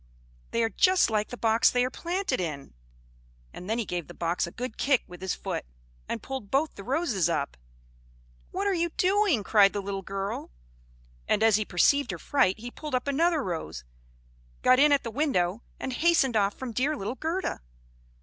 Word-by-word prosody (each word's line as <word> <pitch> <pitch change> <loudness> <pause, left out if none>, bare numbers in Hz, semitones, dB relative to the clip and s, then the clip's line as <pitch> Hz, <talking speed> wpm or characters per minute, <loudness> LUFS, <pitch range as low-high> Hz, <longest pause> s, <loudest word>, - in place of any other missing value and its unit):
They 230 - 0
are 225 - +1
just 365 - +3
like 210 -1 +1
the 245 - -8
box 225 +2 +4
they 250 0 +2
are 255 - -3
planted 345 - -2
in!" 145 - -5 0.8
And 180 - -9
then 225 - +1
he 235 - -1
gave 175 -3 -4
the 175 - -11
box 170 +1 -1
a - - -8
good 245 +2 -5
kick 270 -3 +2
with 180 0 -12
his 190 -1 -2
foot, - - -4 0.5
and - - -3
pulled 265 -7 -6
both 285 +6 +1
the 200 - -10
roses 250 - 0
up. 145 - -1 0.9
"What 390 +2 -3
are 400 - +2
you 340 -1 0
doing?" 380 - +3
cried 200 0 +5
the 205 - -2
little 195 0 -4
girl; 195 +1 -4 0.8
and 215 - +2
as 220 -2 +5
he 215 - -1
perceived 280 +11 +3
her - - -3
fright, 210 -9 +1
he 240 +3 -8
pulled 300 -1 -5
up 250 +2 -1
another 315 +2 +2
rose, 160 - -4 0.8
got 255 0 +6
in 295 +1 +6
at 285 -2 +3
the 230 - -5
window, 220 - 0 0.2
and 260 - -4
hastened 305 -4 +3
off 200 -1 +2
from 260 -2 -6
dear 285 +6 0
little 205 +2 -3
Gerda. 330 +7 -3
240 Hz, 195 wpm, -27 LUFS, 195-290 Hz, 0.9 s, got